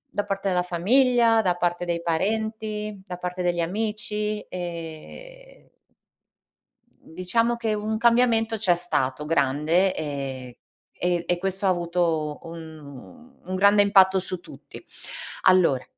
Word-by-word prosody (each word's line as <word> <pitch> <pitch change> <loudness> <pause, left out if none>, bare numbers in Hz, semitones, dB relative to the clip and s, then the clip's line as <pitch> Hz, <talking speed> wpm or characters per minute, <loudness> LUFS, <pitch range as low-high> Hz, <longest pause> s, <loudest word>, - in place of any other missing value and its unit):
da 205 - -1
parte 195 0 -3
della 180 -1 +1
famiglia, 230 +5 +3
da 180 -3 +1
parte 175 0 -1
dei 170 -1 -2
parenti, 215 +3 -2
da 180 -2 -7
parte 180 0 -4
degli 175 -1 0
amici, 210 +3 -2
ehm 180 - -9 1.3
mhmm, 160 - -17
diciamo 230 +7 0
che 225 -2 -1
un 215 +1 -2
cambiamento 230 -1 +3
c'è 190 -5 +3
stato, 150 -5 -2
grande, 155 +5 +2
ehm, 135 -4 -5 0.4
e 175 -1 0
e 175 - +1
questo 195 +2 -2
ha - - +4
avuto 170 -4 -1
un 160 - -11
un 185 +1 -4
grande 200 +2 +5
impatto 190 -2 +5
su 185 0 -4
tutti. - - -13 0.6
Allora, 175 -9 +4
185 Hz, 130 wpm, -24 LUFS, 170-215 Hz, 1.3 s, grande